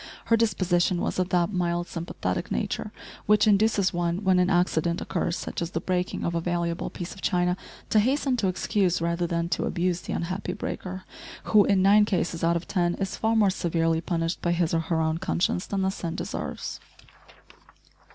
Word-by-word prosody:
Her 230 - +4
disposition 185 -5 +1
was - - -2
of 185 0 0
that 180 +2 +1
mild 175 -1 0
sympathetic 170 0 -3
nature - - -2 0.4
which 210 0 +5
induces 205 -2 +3
one, 175 +2 -1
when 190 -2 +4
an 180 0 +3
accident 175 -2 +1
occurs, 170 +1 -2
such 180 - -5
as 170 - -2
the - - -2
breaking 180 -1 -2
of 170 - -1
a 170 - 0
valuable 170 0 -1
piece 175 0 -6
of 195 - -13
china, 180 0 +1 0.4
to 215 - +5
hasten 265 +3 +1
to 205 - +1
excuse 185 0 +1
rather 170 +1 0
than 170 0 -1
to - - 0
abuse 175 0 0
the - - -5
unhappy 180 +2 -3
breaker, 185 -1 -5 0.4
who, 210 -2 +5
in 195 -2 +3
nine 205 +2 +6
cases 175 -4 -1
out 170 +1 +3
of 170 - -3
ten, 175 -3 +1
is 195 -1 -3
far 225 +1 +1
more 210 -3 +4
severely 165 -2 0
punished 165 -1 -2
by 175 - +1
his 170 -1 0
or 165 - +3
her 165 0 -1
own 160 +1 0
conscience 180 0 0
than 195 -1 -1
the 190 - +1
sin 170 -3 -5
deserves! - - -5
180 Hz, 190 wpm, -26 LUFS, 170-195 Hz, 0.4 s, nine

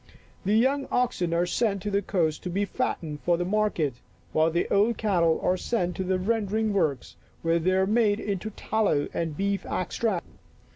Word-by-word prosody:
The 205 +3 +3
young 270 +4 +2
oxen 240 -9 0
are 170 +1 +2
sent 200 0 0
to 210 - -2
the 200 0 +2
coast 170 -6 0
to 180 - -4
be 200 +3 0
fattened 155 -5 -3
for 175 -1 +2
market, 180 - 0 0.4
while 155 +1 +3
the 170 +1 0
old 210 +4 +3
cattle 175 -7 +2
are 185 - +2
sent 180 -4 -1
to 190 - -1
the 185 0 0
rendering 215 +1 0
works, 150 -10 -1 0.3
where 165 0 +2
they 185 +3 +1
are 190 0 +3
made 215 0 +2
into 205 0 -3
tal 220 +1 -1
low 145 -6 +2
and 165 -3 -2
beef 200 0 0
extract. 185 0 -2
190 Hz, 185 wpm, -26 LUFS, 170-215 Hz, 0.4 s, The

